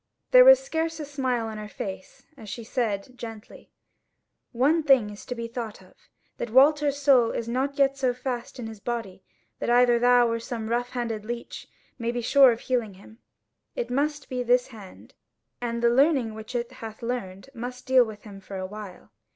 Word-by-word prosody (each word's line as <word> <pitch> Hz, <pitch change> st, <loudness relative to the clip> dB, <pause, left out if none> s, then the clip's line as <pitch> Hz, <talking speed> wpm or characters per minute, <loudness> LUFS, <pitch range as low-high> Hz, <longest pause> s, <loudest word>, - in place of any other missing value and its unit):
There -, -, +9 dB
was -, -, +9 dB
scarce 330 Hz, -9 st, -3 dB
a 300 Hz, -, -4 dB
smile 260 Hz, -5 st, -2 dB
on 220 Hz, -1 st, -6 dB
her 210 Hz, -, -7 dB
face 190 Hz, -2 st, -8 dB
as 220 Hz, -6 st, -11 dB
she 235 Hz, -, -6 dB
said 225 Hz, -1 st, -3 dB
gently: 225 Hz, -3 st, -10 dB, 0.8 s
"One 280 Hz, +7 st, +2 dB
thing 265 Hz, -8 st, +4 dB
is 205 Hz, -, -12 dB
to 250 Hz, -, -4 dB
be 235 Hz, -1 st, -5 dB
thought 230 Hz, -2 st, -6 dB
of, -, -, -19 dB, 0.4 s
that 235 Hz, -, -4 dB
Walter's 285 Hz, +3 st, +4 dB
soul 270 Hz, -5 st, +4 dB
is 230 Hz, -, -4 dB
not 265 Hz, +4 st, -2 dB
yet 275 Hz, -1 st, +2 dB
so 260 Hz, -2 st, +2 dB
fast 250 Hz, 0 st, -5 dB
in 245 Hz, -, -6 dB
his 220 Hz, -1 st, -8 dB
body 225 Hz, -4 st, -5 dB, 0.4 s
that -, -, -2 dB
either 240 Hz, 0 st, +5 dB
thou 245 Hz, 0 st, +5 dB
or 230 Hz, 0 st, -1 dB
some 225 Hz, -1 st, -5 dB
rough 245 Hz, +1 st, 0 dB
handed 230 Hz, -4 st, -4 dB
leech 235 Hz, +2 st, -7 dB, 0.3 s
may 235 Hz, 0 st, -1 dB
be 240 Hz, 0 st, -3 dB
sure 265 Hz, +2 st, +6 dB
of 230 Hz, -, -4 dB
healing 235 Hz, -6 st, -2 dB
him; 220 Hz, +4 st, -17 dB, 0.6 s
it -, -, -3 dB
must 290 Hz, +2 st, -1 dB
be 255 Hz, -1 st, -3 dB
this 245 Hz, +1 st, +2 dB
hand, 210 Hz, -6 st, -13 dB, 0.5 s
and 235 Hz, -1 st, -3 dB
the 235 Hz, -, +5 dB
learning 265 Hz, -3 st, +3 dB
which 220 Hz, +3 st, -9 dB
it 240 Hz, +1 st, -2 dB
hath 225 Hz, -3 st, -10 dB
learned 200 Hz, -5 st, -4 dB
which 235 Hz, -, -10 dB
must 250 Hz, +1 st, -6 dB
deal 260 Hz, -1 st, +5 dB
with 215 Hz, -2 st, -9 dB
him 200 Hz, -2 st, -11 dB
for 195 Hz, 0 st, -8 dB
a 185 Hz, -, -4 dB
while." 195 Hz, -, -10 dB
240 Hz, 200 wpm, -26 LUFS, 220-260 Hz, 0.8 s, There